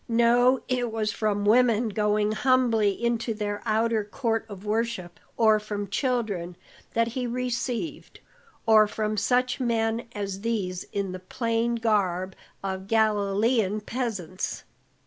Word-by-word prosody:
No, 240 +2 +4
it 245 -3 -1
was 215 -1 -1
from 205 -1 -1
women 230 0 +4
going 210 0 +1
humbly 230 -2 +3
in 235 +3 0
to 230 -1 -3
their 205 -1 -3
outer 220 0 +2
court 225 +1 -2
of 200 0 -9
worship, 215 -5 -2 0.2
or 220 -2 +5
from 205 -1 -5
children, 200 -8 -1 0.4
that 230 0 +2
he 250 +1 -3
received, 250 +3 -3 0.5
or 215 -1 +6
from 215 0 -2
such 250 +5 +1
men 230 -1 0
as 200 -1 -4
these 200 -6 -2
in 200 -2 -3
the 185 - -6
plain 230 +4 -1
garb 190 -5 0 0.3
of 190 0 -4
Galilean 215 0 +2
peasants. 210 -6 -4
220 Hz, 130 wpm, -26 LUFS, 205-235 Hz, 0.5 s, or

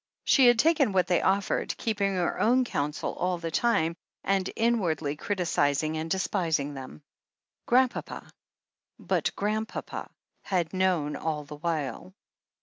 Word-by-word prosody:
She 265 -3 +5
had 240 -1 +6
taken 290 -4 +3
what 185 -2 +3
they 180 -1 +2
offered, 195 +1 0
keeping 200 -3 0
her 175 -2 -1
own 250 +3 +3
counsel 150 -8 -2
all 180 0 -1
the 165 -1 -5
time, 165 -6 +2 0.3
and 195 -1 +1
inwardly 180 -11 0
criticizing 155 -4 0
and 160 +1 -3
de 190 - +1
spising 160 -7 -1
them. 130 - -9 0.6
Grandpapa 255 +1 +1 0.4
— - - -58
^but - - -1
Grandpapa 215 +2 -3 0.3
had 175 -3 -1
known 180 -6 +1
all 155 -2 -3
the 145 +1 -10
while. 165 +2 -3
180 Hz, 140 wpm, -28 LUFS, 155-210 Hz, 0.6 s, had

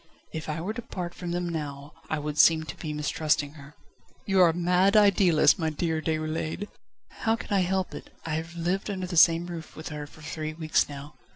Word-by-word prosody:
"If 160 0 -5
I 155 +1 -2
were 200 +6 -3
to 240 - -5
part 175 -6 -6
from 175 -1 -6
them 175 0 -1
now 145 -3 -5 0.2
I 155 - 0
would 150 0 -4
seem 160 -1 +6
to 155 - -7
be 155 - -5
mistrusting 150 -1 0
her." 145 -1 -13 0.5
"You 195 -1 +3
are 175 - +7
a - - +1
mad 180 +4 +3
idealist, 195 -4 +5
my 160 -2 +1
dear 160 +1 -1
Déroulède!" 155 +4 -2 0.5
"How 225 -1 +2
can 225 - -6
I - - +4
help 190 +1 -1
it? - - -9 0.2
I 160 - -2
have 165 +2 -4
lived 180 +5 -1
under 190 -2 -3
the 180 -1 -5
same 165 +1 +6
roof 170 -3 -8
with 155 - -7
her 150 -1 -6
for 155 - -16
three 155 0 -4
weeks 155 -2 +1
now. 145 +1 -8
165 Hz, 215 wpm, -27 LUFS, 155-180 Hz, 0.5 s, are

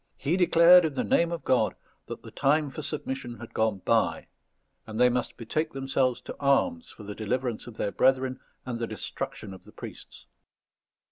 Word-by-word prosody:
He 145 +6 0
declared, 180 0 +7
in 155 -4 -1
the - - 0
name 170 0 +2
of 170 -2 -4
God, 130 - +2 0.3
that - - -7
the - - -11
time 145 +1 +1
for 155 - -6
submission 130 -5 -4
had 120 - -10
gone 110 -3 0
by, - - +1 0.6
and 110 +1 -5
they 125 0 +5
must 125 0 -2
betake 155 +7 -2
themselves 135 -2 0
to - - -8
arms 245 - +1
for 110 - -12
the 105 0 -6
deliverance 120 +3 -3
of 120 - -10
their 100 - -1
brethren 130 +1 +2 0.3
and 120 -2 -4
the 115 - -2
destruction 105 -2 -6
of 95 - -13
the - - -16
priests. - - -11
130 Hz, 185 wpm, -27 LUFS, 120-155 Hz, 0.6 s, declared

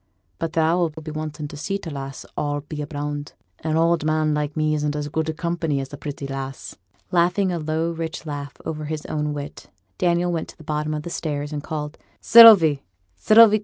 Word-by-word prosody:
But 165 0 -3
thou'll 165 +1 +2
be 155 0 -8
wanting 155 -1 -5
to 145 - -9
see 195 +7 -2
t' 170 -5 -8
lass, 135 -1 -7
a'll 145 -1 -1
be 150 +1 -6
bound. 145 -1 -5 0.3
An 155 0 -1
oud 165 -1 +2
man 155 0 +1
like 150 0 -2
me 155 0 +1
isn't 150 -1 -1
as 150 0 -3
good 160 +1 -2
company 165 -4 -1
as 135 +1 -6
a - - -3
pretty 145 0 -6
lass.' 135 -1 -6 0.4
Laughing 180 +2 +2
a 175 - -2
low 160 +2 -1
rich 165 0 -5
laugh 145 -2 -5
over 155 -1 -4
his 155 0 -4
own 150 -1 -2
wit, 145 0 -7 0.3
Daniel 175 0 +2
went 165 -2 -2
to - - -13
the - - -13
bottom 150 0 -2
of 150 - -4
the 170 - -6
stairs, 145 -2 -3
and 145 - -3
called, 150 0 -5 0.2
'Sylvie, 200 -11 +8 0.3
Sylvie! 215 - +6
155 Hz, 200 wpm, -23 LUFS, 145-165 Hz, 0.4 s, Sylvie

